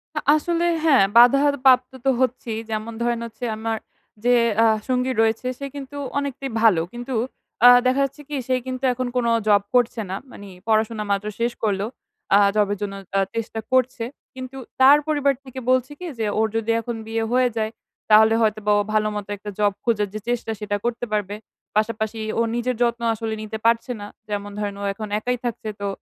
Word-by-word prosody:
আ - - 0 0.2
আসলে 340 +2 0 0.2
হ্যাঁ 275 -10 +6
বাধার 275 +4 +6
প্রাপ্ত 255 -1 +5
তো - - +4
হচ্ছিই 240 -3 -1
যেমন 220 +1 -3
ধরেন 235 0 0
হচ্ছে 230 +1 -7
আমার 225 +1 -2 0.5
যে 245 0 +5 0.3
আ - - +5 0.2
সঙ্গী 255 0 +1
রয়েছে 225 +2 +1
সে 280 - -4
কিন্তু 280 0 -7 0.2
অনেকটাই 275 -1 -3
ভালো। 210 -8 +5
কিন্তু, 245 +2 -5 0.5
আ - - +12 0.2
দেখা 260 +2 +3
যাচ্ছে 275 +2 -8
কি 295 - -3
সেই 255 -1 +1
কিন্তু 255 0 -5
এখন 255 0 -3
কোন 245 - +1 0.2
জব 205 -1 +5
করছে 245 -2 +2
না। 190 - -2 0.2
মানে 200 -1 -11 0.2
পড়াশোনা 220 0 +1
মাত্র 200 +1 0
শেষ 235 +1 +1
করল। 200 -3 +1 0.5
আ - - +8 0.2
জবের 205 -1 +2
জন্য 205 -1 -3 0.2
তারা 195 0 +2
চেষ্টা 225 0 -3
করছে। 255 -2 +2 0.3
কিন্তু 255 +1 -8 0.2
তার 275 +3 +9
পরিবার 290 -2 +2
থেকে 260 -1 -8
বলছে 255 +2 +2
কি 360 - -7
যে 220 - 0
ওর 220 - +3
যদি 225 0 0
এখন 235 +1 -4
বিয়ে 225 0 -1
হয়ে 250 0 +3
যায়, 220 0 -1 0.4
তাহলে 220 +1 +7
হয়তোবা 215 -1 +1
ও - - +3
ভালো 215 0 +2
মত 205 -1 -4
একটা 205 +1 -8
জব 205 -1 +3
খোঁজার 215 -3 +1
যে 215 - -4
চেষ্টা 240 -2 -1
সেটা 210 -1 -2
করতে 240 0 -1
পারবে। 205 -1 -1 0.4
পাশাপাশি 220 +1 -1 0.2
ও - - +4
নিজের 245 +1 -1
যত্ন 235 0 +1
আসলে 225 0 -4
নিতে 215 0 -5
পারছে 230 +2 +2
না। 205 - -6 0.2
যেমন 205 0 -3
ধরেন 205 -1 -3
ও - - -4
এখন 215 +2 -6
একাই 250 +3 -1
থাকছে 225 -2 -3
তো, 200 - -1
230 Hz, 190 wpm, -22 LUFS, 215-255 Hz, 0.5 s, আ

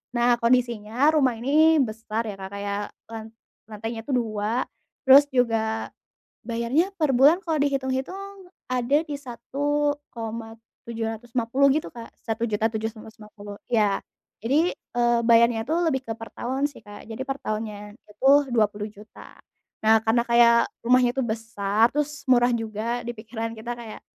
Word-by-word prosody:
nah 240 0 +3
kondisinya 240 +2 +2
rumah 270 -6 +2
ini 305 +7 +4
besar 225 -1 -4
ya, 205 -3 -7
Kak, 190 0 -7
kayak 200 0 -3 0.3
lan 225 -1 -6 0.4
lantainya 225 +1 -6
itu 275 - -3
2, 225 +1 -1 0.4
terus 280 +1 +8
juga 225 -4 0 0.5
bayarnya 240 +11 0
per 300 -4 +2
bulan 285 +8 +6
kalau 325 -2 -1
dihitung-hitung 290 +9 -3 0.2
ada 255 +2 +1
di 295 - -5
Rp1.750.000 235 -3 -3
gitu, 305 +3 0
Kak, 230 -1 -9
Rp1.750.000, 220 -2 -4 0.2
ya, 210 -4 +2 0.4
jadi, 300 +9 +2
eee, 240 -1 0
bayarnya 230 -1 +4
tuh 325 - +1
lebih 265 -5 0
ke 230 - -5
per 225 - -9
tahun 265 +4 -1
sih, 285 -6 -12
Kak, 205 0 -12
jadi 225 +3 -6
per 270 +1 -4
tahunnya 210 -1 -5 0.2
itu 235 +6 0 0.2
Rp20.000.000, 210 -2 -3 0.5
nah 220 0 +5
karena 225 +2 +2
kayak 235 0 +6 0.3
rumahnya 250 +1 +4
itu 270 - 0
besar, 220 -2 +1
terus 295 -1 -3
murah 245 -1 +4
juga, 230 +1 -3
dipikiran 230 0 -5
kita 240 +2 -5
kayak, 225 -2 -9
235 Hz, 130 wpm, -24 LUFS, 220-265 Hz, 0.5 s, terus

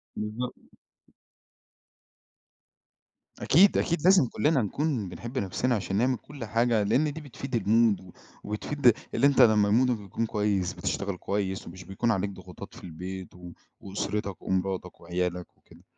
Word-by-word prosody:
بالضبط. 110 +4 -4 2.8
أكيد، 190 +7 +5
أكيد، 170 -2 0
لازم 185 -6 +6
كُلّنا 135 +4 +1
نكون 115 - -1
بنحب 120 +7 -7
نَفْسنا 105 +6 0
عشان 95 -2 -3
نعمل 125 +4 +2
كل 140 -3 -9
حاجة 115 0 +2
لإن 135 +8 +2
دي 160 - -7
بتفيد 135 -2 -6
المود 110 0 +3
و 95 -2 -14 0.3
وبتفيد 120 +4 +2 0.2
اللي 135 +4 +4
أنت 140 - +4
لمّا 105 -2 +5
مودك 125 +3 +3
بيكون 105 +3 -3
كويس، 105 -4 0
بتشتغل 100 -2 -3
كويس 95 0 -3
ومش 90 +2 -9
بيكون 105 +5 -1
عليك 100 0 0
ضغوطات 100 - -11
في - - -13
البيت 90 +2 -7
و 90 -1 -10 0.3
وأسرتك 100 0 -3
ومراتك 95 -1 -2
وعيالك 90 +1 -2
وكده. - - -20
105 Hz, 140 wpm, -27 LUFS, 95-125 Hz, 2.8 s, لازم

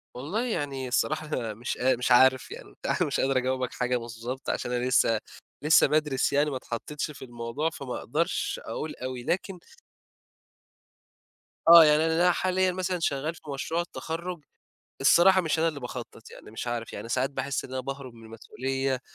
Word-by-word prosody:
والله 170 - -2
يعني 140 - -3
الصراحة 155 +5 0
أنا 115 -7 -3
مش 120 +5 -4
قا 130 +1 +3
مش 125 +1 -2
عارف 130 +1 +5
يعني - - -9
وبتاع، - - -3
مش - - +1
قادر 135 0 +2
أجاوبك 130 0 -1
حاجة 125 0 0
بالضبط 120 +3 -6
عشان 120 - -2
أنا 125 0 -1
لسّه 115 -3 +3 0.4
لسّه 155 0 +5
بادرِس 150 -2 +1
يعني 145 +1 +3
ما 135 - -3
اتحطّيتش 150 +6 -5
في 135 - -10
الموضوع، 120 +6 -3
فما 135 -6 -6
أقدرش - - -1
أقول 155 - -5
أوي، 130 -1 -5
لكن 180 +4 -2 2.1
آه. 170 -1 +11
يعني 150 +1 +4
أنا 165 +2 +3
ال - - +3
حاليًا 185 0 +1
مثلًا 185 -1 -2
شغّال 155 +1 -1
في - - -16
مشروع 160 +5 -2
التخرُّج، 170 0 -5 0.6
الصراحة 185 +7 +6
مش 160 -1 -1
أنا 165 +1 +3
اللي 145 -3 -5
باخطّط 120 -2 -8
يعني - - -13
مش 110 - -6
عارف. 120 -1 -3
يعني 115 - -7
ساعات 130 +3 0
باحِس 135 -1 -3
إن - - -10
أنا 130 0 -3
باهرب 135 -2 -7
من 115 -1 -14
المسؤولية 130 +3 -3
135 Hz, 175 wpm, -27 LUFS, 125-160 Hz, 2.1 s, آه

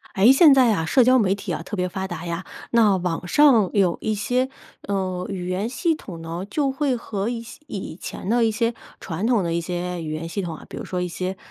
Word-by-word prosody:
诶， 200 +6 +6
现 290 0 +7
在 250 -5 +5
啊， 165 -5 -1
社 245 - +4
交 255 +1 +6
媒 200 -6 +3
体 195 -3 -4
啊， 165 - -4
特 210 - -6
别 180 0 0
发 190 +1 -4
达 175 - -6
呀， 170 +1 -4 0.3
那 215 -5 +4
网 175 -1 -3
上 240 -7 +5
有 190 -4 +2
一 215 - 0
些， 250 +5 0 0.3
呃， 185 -2 -2
语 185 -3 -4
言 190 +5 -1
系 325 +6 0
统 175 - -9
呢， 165 +3 -5
就 280 +5 0
会 270 -1 0
和 210 -2 -3
一 235 -1 -3
些 230 - -12
以 190 -5 -6
前 185 - -7
的 235 +3 +3
一 225 - +3
些 230 +2 0 0.3
传 170 +4 -4
统 235 -3 +3
的 170 -2 -1
一 170 - 0
些 175 0 -4
语 155 - -4
言 155 +2 -4
系 200 +4 -3
统 175 -3 -4
啊， - - -13
比 - - -9
如 - - -6
说 180 - -3
一 180 - -1
些 185 +2 -4
195 Hz, 265 characters per minute, -23 LUFS, 180-235 Hz, 0.3 s, 现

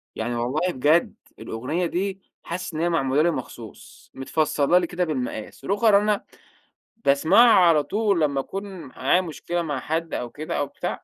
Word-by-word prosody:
يعني 120 +2 -3
والله 130 +10 -1
بجد، 150 +6 +2 0.2
الأغنية 130 +11 -3
دي 190 +3 -3 0.2
حاسس 180 0 -5
إن 155 - -4
هي 170 +1 +1
معمولة 135 -3 +1
لي 170 +2 +3
مخصوص، 120 -5 -9
متفصّلة 150 +3 +1
لي 175 -2 +1
كده 180 0 -2
بالمقاس، 130 -4 -5
روخر 205 +1 +4
أنا 210 0 0 0.8
باسمعه 160 - +5 0.2
على 155 -3 +4
طول، 205 -1 0
لمّا 140 -3 +1
أكون 195 +8 -5 0.2
معايا 135 +7 0
مشكلة 175 0 -4
مع 145 -5 -3
حد 160 +3 -3
أو 120 - -3
كده 155 +6 -5
أو 145 - -1
بتاع - - -5
160 Hz, 165 wpm, -24 LUFS, 135-180 Hz, 0.8 s, باسمعه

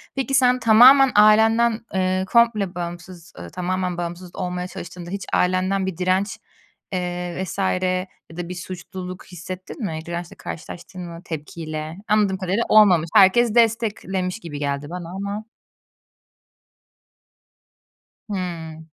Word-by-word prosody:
Peki 270 0 -2
sen, 250 -1 +4
tamamen 250 +4 +7
ailenden, 220 +2 +5
eee, 185 0 0
komple 225 -6 +3
bağımsız, 175 -1 -7
ııı, 85 0 -8
tamamen 180 - -2
bağımsız 175 +1 -6
olmaya 180 0 -3
çalıştığında, 175 -1 -9
hiç 200 0 -4
ailenden 185 +1 +1
bir 190 -4 -4
direnç, 185 +2 0 0.6
eee, 180 0 -3
vs. 190 - -6 0.7
ya 165 - -13
da, 175 0 -5
bir 180 - -5
suçluluk 185 0 -8
hissettin 185 - -7
mi? 160 -3 -3
Dirençle 170 0 -6
karşılaştın 175 +3 -8
mı, 170 -1 -8
tepkiyle? 155 0 -6
Anladığım 210 -3 +2
kadarıyla 190 +4 0
olmamış. 185 -7 +6
Herkes 220 +4 +5
desteklemiş 215 -4 +1
gibi 150 -7 -7
geldi 140 0 -2
bana, 175 -1 -6
ama 200 +2 -4 2.9
Hıı. 165 -4 -5
185 Hz, 120 wpm, -22 LUFS, 175-210 Hz, 2.9 s, tamamen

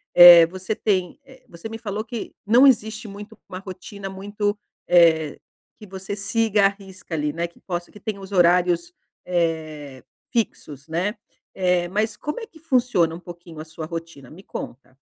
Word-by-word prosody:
eh, 175 -1 +11
você 190 +4 -4
tem 185 -5 -1
eh, 260 -1 -18
você 170 +6 -9
me 225 - -6
falou 215 -1 -4
que 235 -2 -7
não 240 +6 +6
existe 220 -3 +2
muito 205 +2 -10
uma 185 - -7
rotina 195 +1 -8
muito 205 +2 -3 0.3
eh, 160 -3 +4 0.4
que 215 - -12
você 190 +1 -6
siga 210 0 +2
à - - +6
risca 195 -3 -12
ali, 150 -1 0
né, 170 +2 -2
que 170 - -23
possa 175 -2 -5
que 210 - -14
tenha 205 0 -5
os 195 +1 -10
horários, 175 -1 +3 0.3
eh, 155 -6 -2 0.3
fixos, 150 - -3
né. 180 +7 -1 0.4
Eh, 180 -2 +1
mas 210 +2 -1
como 300 +11 -4
é 450 - -8
que 320 - -19
funciona 245 - +2
um 170 - -7
pouquinho 175 -2 -11
a 155 - -7
sua 155 0 -8
rotina? 165 -5 -8
Me 180 +5 -12
conta. 130 +1 -8
185 Hz, 175 wpm, -23 LUFS, 170-210 Hz, 0.4 s, eh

